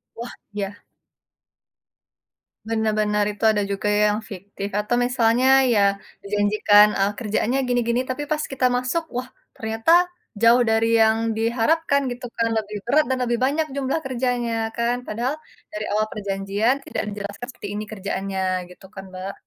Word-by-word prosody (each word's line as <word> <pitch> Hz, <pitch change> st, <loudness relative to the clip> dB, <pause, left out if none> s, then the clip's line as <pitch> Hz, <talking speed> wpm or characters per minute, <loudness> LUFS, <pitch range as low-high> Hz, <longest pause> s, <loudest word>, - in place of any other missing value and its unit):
Wah, 235 Hz, +1 st, -7 dB, 0.2 s
ya. 205 Hz, +1 st, -5 dB, 1.9 s
Benar 220 Hz, -1 st, +1 dB
benar 210 Hz, 0 st, +2 dB
itu 205 Hz, +2 st, -11 dB
ada 210 Hz, -, 0 dB
juga 200 Hz, +1 st, -2 dB
ya, 205 Hz, -, +2 dB, 0.2 s
yang -, -, -3 dB
fiktif 200 Hz, +1 st, -6 dB
atau 210 Hz, +3 st, 0 dB
misalnya 245 Hz, 0 st, +2 dB, 0.3 s
ya 210 Hz, -, +3 dB, 0.4 s
dijanjikan, 205 Hz, +1 st, +4 dB
eee, 200 Hz, +1 st, +2 dB
kerjaannya 230 Hz, +3 st, 0 dB
gini-gini, 245 Hz, 0 st, +1 dB
tapi 260 Hz, +3 st, -2 dB
pas 305 Hz, -, +1 dB
kita 265 Hz, -1 st, 0 dB
masuk, 255 Hz, +7 st, 0 dB
wah 250 Hz, +1 st, -3 dB, 0.3 s
ternyata 225 Hz, +6 st, -1 dB, 0.5 s
jauh 235 Hz, +2 st, +6 dB
dari 225 Hz, 0 st, +2 dB
yang 220 Hz, 0 st, +4 dB, 0.2 s
diharapkan 280 Hz, +6 st, +1 dB
gitu 245 Hz, +1 st, -6 dB
kan, 230 Hz, -, +2 dB
lebih 210 Hz, -1 st, -3 dB
berat 305 Hz, +4 st, +4 dB
dan 260 Hz, -, +1 dB
lebih 240 Hz, -1 st, 0 dB
banyak 300 Hz, +4 st, +1 dB
jumlah 275 Hz, +3 st, -1 dB
kerjanya 245 Hz, -2 st, -1 dB, 0.2 s
kan. 235 Hz, +1 st, +1 dB
Padahal 240 Hz, +6 st, -2 dB, 0.4 s
dari 210 Hz, 0 st, -4 dB
awal 215 Hz, +1 st, +1 dB
perjanjian 200 Hz, +4 st, 0 dB
tidak -, -, -3 dB
dijelaskan 205 Hz, +3 st, -6 dB
seperti 245 Hz, -5 st, -9 dB
ini 210 Hz, -, -3 dB
kerjaannya 195 Hz, -1 st, -3 dB, 0.3 s
gitu 180 Hz, -, -15 dB
kan, 195 Hz, -, -7 dB
Mbak. 185 Hz, +1 st, -6 dB
225 Hz, 150 wpm, -23 LUFS, 205-245 Hz, 1.9 s, jauh